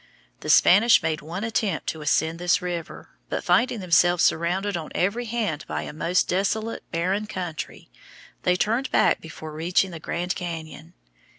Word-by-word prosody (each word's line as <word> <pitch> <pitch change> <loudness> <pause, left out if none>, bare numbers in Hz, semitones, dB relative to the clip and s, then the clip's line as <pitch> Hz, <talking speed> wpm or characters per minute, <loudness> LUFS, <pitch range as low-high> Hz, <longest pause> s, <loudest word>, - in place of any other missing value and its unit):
The - - -7
Spanish 210 +3 +6
made 160 -1 -1
one 170 +6 -6
attempt 215 -6 -1
to 160 - -5
ascend 160 +2 +1
this 175 0 +2
river, 175 -3 -6 0.2
but - - -3
finding 245 -3 +2
themselves 175 -1 +3
surrounded 185 +5 +1
on 160 -3 -4
every 210 +7 0
hand 215 -10 -2
by - - -3
a - - -7
most 170 +4 +1
desolate, 215 +4 -1
barren 185 +5 -1
country, 180 -6 -6 0.5
they 180 - +2
turned 230 +8 0
back - - +3
before 155 -1 -9
reaching 175 +4 0
the 165 - -7
Grand 175 +3 -2
Cañon. 165 -2 -7
180 Hz, 160 wpm, -24 LUFS, 165-205 Hz, 0.5 s, Spanish